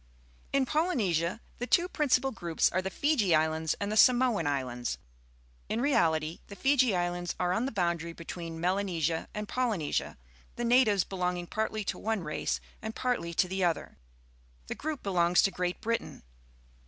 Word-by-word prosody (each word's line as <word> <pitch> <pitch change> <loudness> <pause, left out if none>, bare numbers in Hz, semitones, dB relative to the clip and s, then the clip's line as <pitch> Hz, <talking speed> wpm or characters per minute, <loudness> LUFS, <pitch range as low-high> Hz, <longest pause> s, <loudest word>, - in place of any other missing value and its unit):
In 275 -1 +2
Polynesia 225 - 0 0.2
the 245 - -3
two 350 +5 +3
principal 270 -5 +1
groups 170 -8 0
are 185 - +1
the 190 - -3
Fiji 225 - +2
Islands 160 0 +1
and 205 0 -2
the - - -1
Samoan 240 - +4
Islands. 125 -4 -2 0.7
In 225 - -1
reality, 165 - +1
the 200 - -9
Fiji 260 -4 +3
Islands 175 0 -2
are 180 0 +1
on 230 +6 0
the - - -3
boun 175 -4 +1
dary 170 +1 -6
between 165 0 -7
Melanesia 175 -3 0
and 210 0 -4
Polynesia, 160 - -1 0.4
the 240 - -2
natives 230 -6 +4
belonging 180 -2 -2
partlj^ 215 +2 -2
to - - -3
one 220 -4 -1
race 150 - -2 0.2
and 220 0 -5
partly 245 -10 -1
to 185 - +3
the 190 +1 -2
other. 165 - -1 0.7
The - - -4
group 305 -2 -5
belongs 180 -3 +3
to 195 - +3
Great 180 -1 -2
Britain. 230 +1 -3
190 Hz, 165 wpm, -30 LUFS, 170-235 Hz, 0.7 s, Samoan